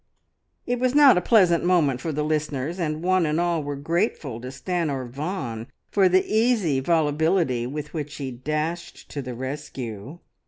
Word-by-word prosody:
It 245 0 -1
was 255 +1 +1
not 285 -5 +8
a 180 - +2
pleasant 180 -5 +4
moment 155 -8 +2
for 160 - -2
the 150 0 -1
listeners, 150 +1 -2
and 155 -1 -2
one 185 0 +3
and 150 +2 0
all 170 -2 +1
were 145 0 -4
grateful 145 - -2
to 125 - -7
Stanor 140 -1 -2
Vaughan 130 - -4 0.2
for 195 -2 +4
the 185 +1 +3
easy 215 - +2
volubility, 155 -3 +1
with 150 +3 -6
which 150 -2 -5
he 135 -2 -5
dashed 155 +7 -4
to 145 - -4
the 125 -2 -6
rescue. 130 -1 -6
155 Hz, 165 wpm, -24 LUFS, 135-175 Hz, 0.2 s, not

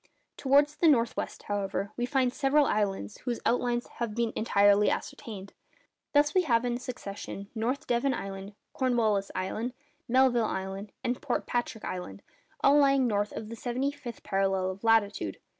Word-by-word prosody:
Towards 285 +2 +3
the 330 - +4
north 240 -6 +4
west, - - -5
however, 200 0 -2
we 240 0 -1
find 255 -2 +1
several 290 +1 +3
islands 195 - -1
whose 240 -2 -1
outlines 240 0 +1
have 230 -3 -5
been 235 -1 0
entirely 205 -1 +4
ascertained. 200 -4 -5 0.6
Thus 290 +1 +4
we 370 - +5
have 245 -7 +2
in 240 0 -1
succession 200 -5 -7
North 245 +6 -2
Devon 245 +2 +1
Island, 195 0 -7 0.2
Cornwallis 225 -6 +1
Island, 215 +6 -2 0.3
Melville 250 -2 +4
Island, 195 +1 -4
and 245 0 -1
Port 270 -5 -1
Patrick 240 -2 -2
Island, 180 - -6 0.4
all 285 +1 +6
lying 275 -2 +4
north 205 -3 0
of 215 - -6
the 230 - -6
seventy 250 +4 -1
fifth 260 -6 -9
parallel 195 -1 0
of 190 +3 -11
latitude. 210 - +2
235 Hz, 160 wpm, -29 LUFS, 200-260 Hz, 0.6 s, all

